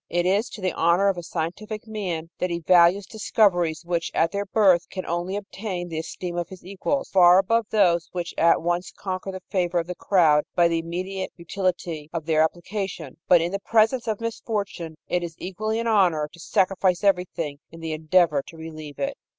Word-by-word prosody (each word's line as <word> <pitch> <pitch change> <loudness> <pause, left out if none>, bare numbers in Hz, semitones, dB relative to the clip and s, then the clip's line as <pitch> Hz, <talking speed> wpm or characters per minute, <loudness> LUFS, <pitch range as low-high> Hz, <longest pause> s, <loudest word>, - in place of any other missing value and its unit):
It 175 0 0
is 200 +5 +2
to 210 - -9
the 185 -2 0
honor 175 +4 +3
of 195 - -1
a - - -5
scientific 180 +7 -5
man 180 -7 -4
that 180 - 0
he 170 - -1
values 175 +3 +4
discoveries 175 -6 +1
which 170 -1 -1
at 165 - +2
their 200 0 -3
birth 190 -5 +3
can 185 - -5
only 175 +3 -2
obtain 195 -3 -5
the 160 -1 -3
esteem 175 +1 -5
of 175 - -3
his 185 -2 -12
equals, 200 +9 -2
far 180 -1 +7
above 225 +3 +2
those 175 -6 +2
which 175 -1 -4
at 165 -1 +3
once 175 +1 -1
conquer 190 0 -4
the 185 -1 -8
favor 180 -2 0
of 170 - +1
the 180 - -5
crowd 165 -6 +3
by 175 -1 +5
the 165 -1 0
immediate 185 +3 -4
utility 170 -3 -3
of 165 -3 -3
their 160 -1 +3
application; 175 -2 -3
but, 175 -2 +6
in 170 +1 -1
the 200 - -2
presence 230 +4 +2
of 215 -2 -1
misfortune, 205 -7 -4
it 180 - 0
is 170 -2 -6
equally 215 +4 -3
an 230 - -2
honor 180 -9 +3
to 170 - -15
sacrifice 185 +1 +1
everything 180 -7 0
in 165 - -12
the 160 -1 -4
endeavor 155 -1 +3
to 165 - -12
relieve 155 -2 -9
it." 275 0 -2
180 Hz, 200 wpm, -24 LUFS, 165-200 Hz, -, far